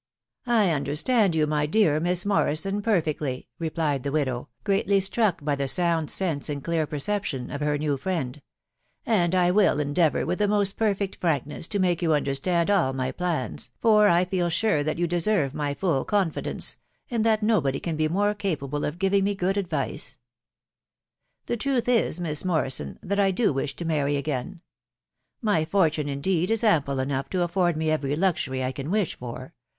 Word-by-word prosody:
t€ - - -1
I 215 -6 +4
understand 160 - +1
you, 155 -1 +3
my 150 0 0
dear 160 -4 +3
Miss 175 +2 0
Morrison, 195 0 +1
perfectly," 155 - -1
replied 155 -4 -1
the 140 - -3
widow, 130 -6 -1
greatly 200 -1 +2
struck 195 -5 0
by 145 -2 +1
the 140 0 -2
sound 165 +2 +2
sense 160 -7 -1
and 145 -2 -4
clear 165 -2 0
perception 150 -4 -2
of 145 - -5
her 150 0 +1
new 145 -1 -1
friend; 150 -4 -3 0.4
" - - -52 0.2
and 185 -6 +2
I 180 -1 +3
will 190 -6 +3
endeavour, 150 +2 +1
with 180 - -2
the 205 - +2
most 200 -1 +2
perfect 200 -3 -1
frankness, 150 -2 -1
to 205 - 0
make 180 -3 +1
you 160 -3 +3
understand 165 +6 0
all 170 -10 +2
my 130 -1 -2
plans, 170 -3 -3
for 210 -2 +5
I 175 -1 +4
feel 180 -2 -1
sure 170 -3 +1
that 155 +2 -2
you 175 - +1
deserve 175 -4 +1
my 145 -1 -2
full 160 -6 0
confidence, 195 -6 0 0.3
and 230 -2 0
that 220 -1 +2
nobody 160 -12 +1
can 165 -2 -3
be 155 0 +1
more 205 +5 +1
capable 150 -8 -3
of 150 +3 -4
giving 195 +1 +2
me 200 +1 0
good 190 0 0
advice. 170 -9 -2
•.. - - -23 1.3
The 240 - -2
truth 255 0 -1
is, 230 -8 +2
Miss 155 -4 -2
Morrison, 135 - 0
that 200 +2 -1
I 195 -1 +4
do 200 -1 +1
wish 135 +1 -3
to 170 - -5
marry 145 -3 0
again. 140 +5 -4 0.8
My 205 -8 +2
fortune, 155 -4 +1
indeed, 170 +5 0
16 225 0 +2
ample 140 -8 +2
enough 135 0 -2
to 185 -2 0
afford 175 -1 +1
me 155 0 0
every 145 -2 0
luxury 155 -7 0
I 130 - -1
can 135 +3 -6
wish 200 -3 0
for 125 +1 -8
165 Hz, 185 wpm, -25 LUFS, 145-195 Hz, 1.3 s, for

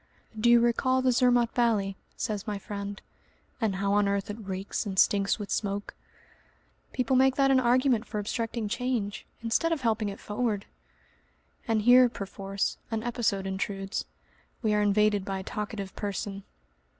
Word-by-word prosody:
"Do 220 +2 +2
you 235 0 +7
recall 255 +2 +2
the 255 - +4
Zermatt 245 -1 +3
valley?" 215 -5 +1 0.2
says 210 0 -3
my 210 -1 -2
friend, 200 0 -6 0.6
"and 215 -4 +1
how 200 +1 0
on 205 0 +3
earth 200 0 -1
it 210 - -7
reeks 195 -2 -4
and 195 -3 -5
stinks 200 +1 +3
with 205 -2 -6
smoke?" 205 -1 -2 1.0
"People 255 0 0
make 265 0 +4
that 275 -1 +3
an 265 - +5
argument 250 -1 +2
for 215 - -5
obstructing 225 +1 -2
change, 235 -2 -2 0.2
instead 235 +9 +1
of 320 -4 0
helping 220 -3 0
it 200 - -8
forward!" 210 -1 -2 1.0
And 220 -2 +1
here 250 +2 +7
perforce 195 -2 -3
an 220 -1 -2
episode 230 -5 -1
intrudes. 195 +1 -3 0.6
We 215 -1 +2
are 210 - +2
invaded 205 0 +3
by 195 0 -3
a 190 - -5
talkative 205 -1 -5
person. 200 -1 -4
210 Hz, 160 wpm, -28 LUFS, 200-240 Hz, 1.0 s, you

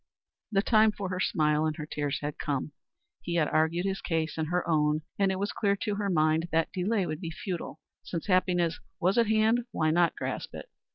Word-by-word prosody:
The 195 -1 +2
time 220 -1 +5
for 200 -2 -5
her 185 0 -3
smile 155 -3 +2
and 155 - -2
her 155 -2 -5
tears 145 -2 -3
had 145 0 -4
come. 145 -1 -2 0.5
He 170 - -3
had 160 -3 +3
argued 160 +3 +1
his 195 0 -2
case 160 -2 -1
and 160 -1 -2
her 180 +2 -1
own, 150 -1 +2 0.2
and 195 -1 +3
it 190 - -2
was 200 +2 -1
clear 200 -2 +1
to 210 +1 -2
her 200 0 -1
mind 160 -1 +2
that 165 0 +1
delay 195 +2 0
would 155 +1 -4
be 165 - -4
futile. 175 +1 -5 0.2
Since 170 -3 -5
happiness 180 -3 +2 0.2
was 190 +7 +2
at 230 - +3
hand, 220 +2 +3
why 155 -8 +1
not 170 +1 +3
grasp - - -4
it? - - -9
175 Hz, 215 wpm, -29 LUFS, 155-195 Hz, 0.5 s, time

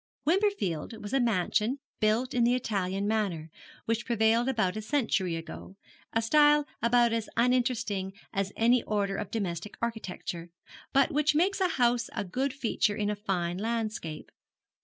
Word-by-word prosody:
Wimperfield 310 - 0
was 205 +3 -7
a 270 - +3
mansion 230 +2 +1 0.2
built 220 +4 +1
in 245 - +2
the 240 +1 +4
Italian 195 -4 -1
manner 190 -8 -1 0.3
which 230 +1 0
prevailed 230 +1 +2
about 220 -8 0
a 215 - -3
century 215 - 0
ago, 165 +3 -8 0.4
a 225 - 0
style 295 +4 +5 0.2
about 235 0 +4
as 225 -2 -2
uninteresting 235 -6 +1 0.2
as 195 0 -1
any 235 +2 +4
order 200 -2 -1
of 205 0 -4
domestic 195 -3 -4
architecture, 185 -7 -4 0.4
but 275 +4 +3
which 300 0 +2
makes 385 +5 +2
a 370 - +4
house 240 -1 +2
a - - -1
good 260 +9 -1
feature 230 -6 0
in 205 0 -1
a - - -2
fine 185 -4 -2
landscape. 215 -8 -3
225 Hz, 155 wpm, -29 LUFS, 195-250 Hz, 0.4 s, style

